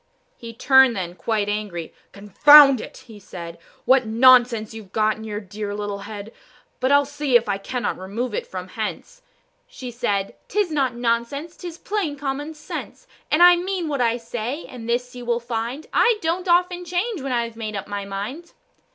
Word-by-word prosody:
He 230 Hz, -1 st, -9 dB
turned, 265 Hz, +1 st, +5 dB
then, 175 Hz, -3 st, -4 dB
quite 210 Hz, +2 st, -2 dB
angry. 205 Hz, -6 st, -4 dB, 0.2 s
"Confound 275 Hz, +7 st, +7 dB
it!" -, -, -11 dB
he 220 Hz, -4 st, -13 dB
said, 170 Hz, -4 st, -9 dB, 0.3 s
"What 260 Hz, -3 st, +4 dB
nonsense 235 Hz, -1 st, +4 dB
you've 215 Hz, -4 st, -11 dB
got 215 Hz, 0 st, +1 dB
in 220 Hz, -, -10 dB
your 210 Hz, -1 st, -4 dB
dear 205 Hz, 0 st, -6 dB
little 205 Hz, -1 st, -4 dB
head; 210 Hz, +1 st, -8 dB, 0.5 s
But 260 Hz, +2 st, +1 dB
I'll 285 Hz, 0 st, +5 dB
see 290 Hz, -2 st, -2 dB
if 235 Hz, -2 st, +4 dB
I 200 Hz, -1 st, -1 dB
cannot 245 Hz, +2 st, -3 dB
remove 210 Hz, +6 st, -4 dB
it -, -, -3 dB
from 185 Hz, -1 st, -7 dB
hence." 220 Hz, -, -6 dB, 0.5 s
She 250 Hz, -2 st, -8 dB
said, 205 Hz, -5 st, -2 dB
"'Tis 410 Hz, -3 st, 0 dB
not 270 Hz, -5 st, 0 dB
nonsense, 240 Hz, +7 st, -2 dB
'tis 345 Hz, -2 st, -8 dB
plain 380 Hz, -7 st, -3 dB
common 290 Hz, +3 st, -4 dB
sense: 305 Hz, +10 st, -8 dB, 0.2 s
And 310 Hz, +3 st, +4 dB
I 355 Hz, 0 st, +8 dB
mean 360 Hz, -1 st, -3 dB
what 280 Hz, -3 st, -1 dB
I 235 Hz, 0 st, +2 dB
say, 240 Hz, +5 st, -5 dB
and 235 Hz, -2 st, -9 dB
this 245 Hz, +1 st, -2 dB
you 245 Hz, -, -8 dB
will 235 Hz, 0 st, 0 dB
find, 235 Hz, +4 st, -4 dB
I 465 Hz, -2 st, +4 dB
don't 350 Hz, +2 st, -2 dB
often 360 Hz, +1 st, +2 dB
change 360 Hz, -, -2 dB
when 270 Hz, 0 st, -4 dB
I've 235 Hz, -2 st, -2 dB
made 215 Hz, -2 st, -5 dB
up 200 Hz, -1 st, -5 dB
my 205 Hz, -1 st, -4 dB
mind." 205 Hz, +13 st, -6 dB
240 Hz, 185 wpm, -22 LUFS, 210-290 Hz, 0.5 s, I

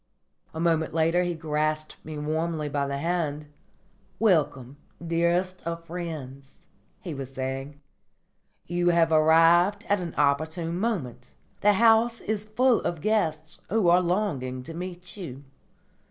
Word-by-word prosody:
A 160 Hz, -, -7 dB
moment 165 Hz, -1 st, +1 dB
later 165 Hz, +2 st, +3 dB
he 175 Hz, -1 st, -1 dB
grasped 155 Hz, -1 st, -2 dB
me 155 Hz, -1 st, -7 dB
warmly 155 Hz, +1 st, -2 dB
by 140 Hz, -1 st, -1 dB
the 140 Hz, 0 st, -3 dB
hand, 155 Hz, -2 st, -2 dB, 0.7 s
"Welcome, 145 Hz, -, +1 dB, 0.3 s
dearest 175 Hz, +2 st, 0 dB
of 170 Hz, 0 st, -5 dB
friends," 155 Hz, -6 st, -7 dB, 0.5 s
he 175 Hz, -, -6 dB
was 135 Hz, -2 st, -6 dB
saying. 135 Hz, +2 st, -5 dB, 0.9 s
"You 175 Hz, +1 st, +1 dB
have 170 Hz, -1 st, +3 dB
arrived 165 Hz, +5 st, +5 dB
at 205 Hz, -2 st, +1 dB
an 170 Hz, -2 st, -6 dB
opportune 160 Hz, +4 st, 0 dB
moment. 135 Hz, -, -3 dB, 0.2 s
The 210 Hz, 0 st, +4 dB
house 230 Hz, +2 st, +4 dB
is 210 Hz, -1 st, -3 dB
full 245 Hz, +2 st, +3 dB
of 170 Hz, -, -3 dB
guests 160 Hz, -8 st, -1 dB
who 210 Hz, -4 st, +3 dB
are 175 Hz, +1 st, +5 dB
longing 160 Hz, -9 st, -1 dB
to 165 Hz, -, -8 dB
meet 180 Hz, +2 st, -7 dB
you." 140 Hz, -8 st, -8 dB
165 Hz, 135 wpm, -26 LUFS, 150-180 Hz, 0.9 s, arrived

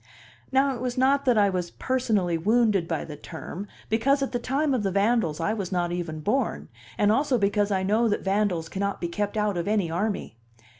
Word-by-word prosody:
Now 270 Hz, +1 st, +3 dB
it 245 Hz, -, -7 dB
was 250 Hz, 0 st, -3 dB
not 275 Hz, +2 st, +3 dB
that 250 Hz, -3 st, +4 dB
I 200 Hz, -2 st, +4 dB
was 180 Hz, -2 st, -2 dB
personally 220 Hz, -10 st, 0 dB
wounded 210 Hz, 0 st, +2 dB
by 160 Hz, -3 st, -2 dB
the 150 Hz, -, -8 dB
term, 170 Hz, +6 st, -8 dB, 0.2 s
because 275 Hz, +6 st, +2 dB
at 270 Hz, -, -3 dB
the 245 Hz, -, -1 dB
time 275 Hz, +4 st, 0 dB
of 250 Hz, -, +1 dB
the 200 Hz, -, 0 dB
vandals 200 Hz, -4 st, +1 dB
I 185 Hz, +6 st, 0 dB
was 200 Hz, -4 st, -4 dB
not 175 Hz, -2 st, 0 dB
even 170 Hz, -3 st, -4 dB
born, 240 Hz, -, -1 dB, 0.3 s
and 205 Hz, 0 st, +3 dB
also 270 Hz, +2 st, +2 dB
because 205 Hz, 0 st, +1 dB
I 190 Hz, -2 st, 0 dB
know 215 Hz, +5 st, +2 dB
that 205 Hz, -, -1 dB
vandals 195 Hz, -4 st, 0 dB
cannot 200 Hz, +3 st, -2 dB
be 170 Hz, -, -2 dB
kept 205 Hz, +4 st, -3 dB
out 210 Hz, -3 st, 0 dB
of 170 Hz, -, -2 dB
any 205 Hz, -6 st, +1 dB
army. 185 Hz, -, -2 dB
205 Hz, 210 wpm, -26 LUFS, 180-240 Hz, 0.3 s, that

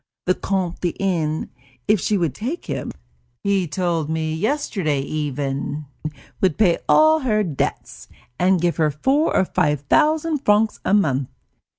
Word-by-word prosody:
The 185 Hz, -, +3 dB
Comte 185 Hz, -2 st, -2 dB
de 175 Hz, -2 st, -2 dB
N., 165 Hz, -5 st, -1 dB, 0.4 s
if 210 Hz, -1 st, +4 dB
she 210 Hz, +4 st, +1 dB
would 165 Hz, -7 st, 0 dB
take 260 Hz, -, -4 dB
him, -, -, -4 dB, 0.5 s
he 195 Hz, -3 st, +1 dB
told 165 Hz, -1 st, -1 dB
me 160 Hz, 0 st, -1 dB
yesterday 190 Hz, -, -1 dB
even, 145 Hz, 0 st, -3 dB, 0.6 s
would 185 Hz, -6 st, +2 dB
pay 180 Hz, -6 st, +3 dB
all 315 Hz, 0 st, +6 dB
her 215 Hz, -7 st, +1 dB
debts, 130 Hz, -, -4 dB, 0.3 s
and 185 Hz, 0 st, +3 dB
give 170 Hz, 0 st, 0 dB
her 155 Hz, -2 st, +3 dB
four 265 Hz, -, +1 dB
or 190 Hz, -, +3 dB
five 150 Hz, -5 st, 0 dB
thousand 310 Hz, -, +2 dB
francs 215 Hz, -3 st, +2 dB
a 195 Hz, -, +3 dB
month. 140 Hz, -9 st, +1 dB
180 Hz, 150 wpm, -21 LUFS, 150-210 Hz, 0.6 s, all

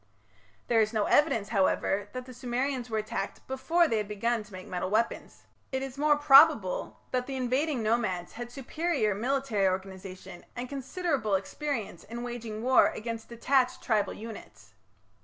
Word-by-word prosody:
There 230 Hz, -2 st, +4 dB
is 215 Hz, +1 st, 0 dB
no 215 Hz, -2 st, +2 dB
evidence, 230 Hz, -9 st, +3 dB
however, 200 Hz, -1 st, +1 dB
that 255 Hz, 0 st, -5 dB
the 255 Hz, -, -10 dB
Sumerians 250 Hz, +1 st, -2 dB
were 220 Hz, -, -1 dB
attacked 215 Hz, -2 st, -4 dB
before 325 Hz, +6 st, +2 dB
they 225 Hz, -, +1 dB
had 210 Hz, -1 st, -2 dB
begun 225 Hz, +3 st, 0 dB
to 210 Hz, 0 st, -14 dB
make 185 Hz, -1 st, -8 dB
metal 180 Hz, 0 st, -3 dB
weapons. 220 Hz, +3 st, -1 dB, 0.3 s
It 265 Hz, 0 st, -1 dB
is 270 Hz, -1 st, -6 dB
more 300 Hz, 0 st, +4 dB
probable 290 Hz, -, +5 dB
that 250 Hz, -1 st, -1 dB
the 270 Hz, -, -4 dB
invading 260 Hz, +1 st, 0 dB
nomads 215 Hz, -6 st, 0 dB
had 240 Hz, 0 st, -7 dB
superior 275 Hz, -, -1 dB
military 235 Hz, -2 st, 0 dB
organization 185 Hz, -1 st, -5 dB
and 245 Hz, +1 st, -4 dB
considerable 275 Hz, -, -1 dB
experience 220 Hz, -, -3 dB
in 235 Hz, +2 st, -7 dB
waging 230 Hz, -3 st, -5 dB
war 260 Hz, +1 st, +6 dB
against 230 Hz, 0 st, -5 dB
detached 250 Hz, +2 st, +1 dB
tribal 215 Hz, -3 st, +1 dB
units. 115 Hz, -, -10 dB
235 Hz, 160 wpm, -29 LUFS, 210-265 Hz, 0.3 s, war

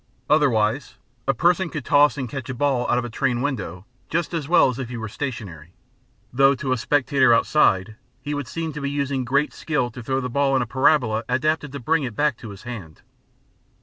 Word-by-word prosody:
Otherwise 125 Hz, -4 st, +2 dB, 0.3 s
a 135 Hz, -, +3 dB
person 175 Hz, +6 st, +2 dB
could 150 Hz, -5 st, -6 dB
toss 145 Hz, -1 st, +4 dB
and 130 Hz, -2 st, -3 dB
catch 135 Hz, +1 st, -6 dB
a 130 Hz, -, -3 dB
ball 130 Hz, -2 st, 0 dB
out -, -, +3 dB
of 125 Hz, -, -1 dB
a -, -, -5 dB
train 120 Hz, +1 st, 0 dB
window 105 Hz, -, -3 dB, 0.2 s
just 170 Hz, 0 st, -1 dB
as 160 Hz, -4 st, -2 dB
well 175 Hz, -, +6 dB
as 130 Hz, 0 st, -3 dB
if 130 Hz, -3 st, -4 dB
he 125 Hz, -, -5 dB
were 110 Hz, -1 st, -4 dB
stationary; 105 Hz, -, -6 dB, 0.6 s
though 135 Hz, +2 st, +5 dB
to 130 Hz, 0 st, -3 dB
a 130 Hz, -, +2 dB
spectator 135 Hz, -1 st, +3 dB
outside 110 Hz, -5 st, +2 dB, 0.2 s
he 145 Hz, -, -5 dB
would 145 Hz, -3 st, -4 dB
seem 165 Hz, +2 st, -4 dB
to 150 Hz, -, -6 dB
be 140 Hz, -, -2 dB
using 140 Hz, -2 st, -1 dB
great 140 Hz, +4 st, +1 dB
skill 145 Hz, -6 st, -1 dB
to 125 Hz, -, -9 dB
throw 130 Hz, +3 st, -1 dB
the 125 Hz, -, -3 dB
ball 135 Hz, +2 st, +1 dB
in -, -, +3 dB
the -, -, -1 dB
parabola 125 Hz, -3 st, +2 dB
adapted 150 Hz, +3 st, 0 dB
to 140 Hz, -, -6 dB
bring 160 Hz, +6 st, +1 dB
it 120 Hz, -6 st, -4 dB
back 150 Hz, -1 st, +1 dB
to 115 Hz, -, -10 dB
his 100 Hz, -1 st, -11 dB
hand. 105 Hz, -11 st, -9 dB
130 Hz, 215 wpm, -23 LUFS, 120-145 Hz, 0.6 s, well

